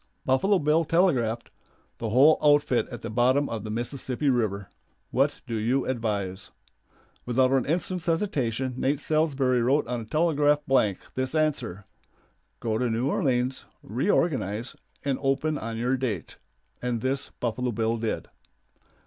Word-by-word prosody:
Buffalo 190 +10 +3
Bill 155 0 +2
telegraphed, 130 -10 +1 0.5
"The 115 - -2
whole 135 +8 +6
outfit 145 -4 +3
at 120 - -8
the - - -5
bottom 130 +5 +3
of 110 -3 -4
the 110 - -6
Mississippi 125 +4 -1
River. 100 -6 -1 0.4
What 140 +3 +1
do 120 - -6
you 115 +5 +1
advise?" 105 -6 -3 0.7
Without 130 +1 +2
an 135 -2 +2
instant's 175 +2 -1
hesitation 135 - 0
Nate 135 +2 0
Salsbury 140 -5 +1
wrote 135 +5 +2
on 120 0 -3
a - - -8
telegraph 150 +1 +2
blank 105 -8 +2 0.2
this 130 +3 -2
answer, 125 - -1 0.7
"Go 110 -2 -1
to 125 -1 +1
New 120 +5 0
Orleans, 130 -1 0 0.2
reorganize, 120 - 0 0.3
and 135 -2 0
open 145 +3 0
on 115 0 -5
your 125 +3 +1
date," 115 -9 -4 0.4
and 120 -2 -2
this 135 +2 -1
Buffalo 125 +1 -1
Bill 115 +1 0
did. 110 -1 -3
130 Hz, 140 wpm, -26 LUFS, 115-145 Hz, 0.7 s, whole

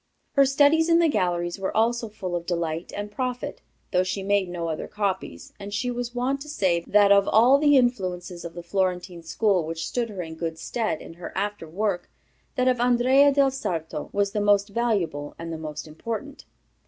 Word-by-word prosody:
"Her 275 -1 +4
studies 290 +4 +4
in 335 - +6
the 340 -1 +4
galleries 175 - 0
were 195 - -2
also 230 0 +1
full 190 -4 -5
of 170 0 -4
delight 170 -1 -2
and 205 0 -5
profit, 250 +2 -4 0.3
though 180 - +3
she 190 +1 -2
made 200 -2 +1
no 170 -1 -4
other 160 -1 -3
copies, 190 - -3
and 200 0 -7
she 245 +4 -1
was 245 0 -4
wont 265 +3 -1
to 300 - -8
say 185 - +1
that 205 -1 +5
of 200 0 +5
all 245 +6 +5
the 290 -1 +5
influences 185 -8 -1
of 170 -1 -8
the 175 - -7
Florentine 180 -1 -2
school 185 +2 +1
which 165 +1 -4
stood 240 -2 -2
her 195 -4 -5
in 160 -1 -8
good 160 0 -4
stead 215 -1 -2
in - - -10
her - - -6
after 205 -4 -3
work, 190 0 -2 0.5
that 255 0 +1
of 250 -1 +2
Andrea 250 +4 +5
del 275 -1 +3
Sarto 160 - -4
was 200 0 0
the 210 - -1
most 205 0 +3
valuable 200 -10 -1
and 165 0 -6
the 160 - -5
most 150 -1 -6
important. 230 - -6
200 Hz, 200 wpm, -25 LUFS, 175-245 Hz, 0.5 s, in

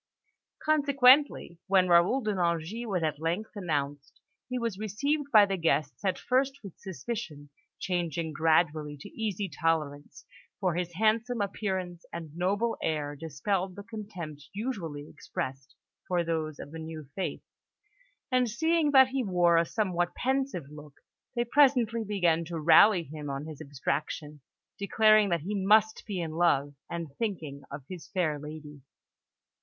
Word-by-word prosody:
Consequently, 280 - +4
when 190 -1 +4
Raoul 175 +10 +4
de 215 -3 -1
Nangis 175 +5 -1
was 185 -5 -1
at 155 -2 -1
length 175 +7 -2
announced, 145 -7 -3 0.3
he 250 - -2
was 230 -5 -3
received 280 +8 -1
by 215 -3 +8
the 195 -1 -2
guests 150 -2 0
at 190 -2 +1
first 265 +1 0
with 195 -4 -11
suspicion, 175 - -6 0.3
changing 170 -3 -2
gradually 155 -1 +2
to - - -10
easy 210 -3 -3
tolerance, 150 -2 -2 0.3
for 185 -4 +1
his 175 0 -3
handsome 220 +4 +1
appearance 190 -3 -3
and 160 -3 -7
noble 200 +6 0
air 150 -2 -2
dispelled 180 +5 -2
the 200 - -8
contempt 185 -9 -8
usually 185 - -4
expressed 135 -2 -6 0.3
for 175 -1 +1
those 160 -3 -2
of 145 - -9
the 160 - -7
new 160 -2 -7
faith; 190 - -4 0.9
and 250 -1 +3
seeing 320 +6 +2
that 265 -2 +7
he 265 0 -1
wore 175 -4 +3
a 165 0 +4
somewhat 180 -5 -1
pensive 265 - -1
look, 150 -1 -12 0.4
they 240 0 +1
presently 240 -3 +3
began 175 -6 +1
to 165 0 -5
rally 175 +4 +6
him 150 -1 -7
on 140 +1 -4
his 155 -2 -9
abstraction, 145 +2 -4 0.4
declaring 215 +1 +4
that 170 -3 0
he 195 +7 -4
must 210 +2 +3
be 200 -4 -3
in 165 -2 -3
love 145 -4 +2 0.2
and 165 -5 -5
thinking 160 -11 -3
of 140 -1 -7
his 180 -2 -9
fair 160 -6 -1
lady. 150 -1 -9
180 Hz, 150 wpm, -29 LUFS, 155-215 Hz, 0.9 s, by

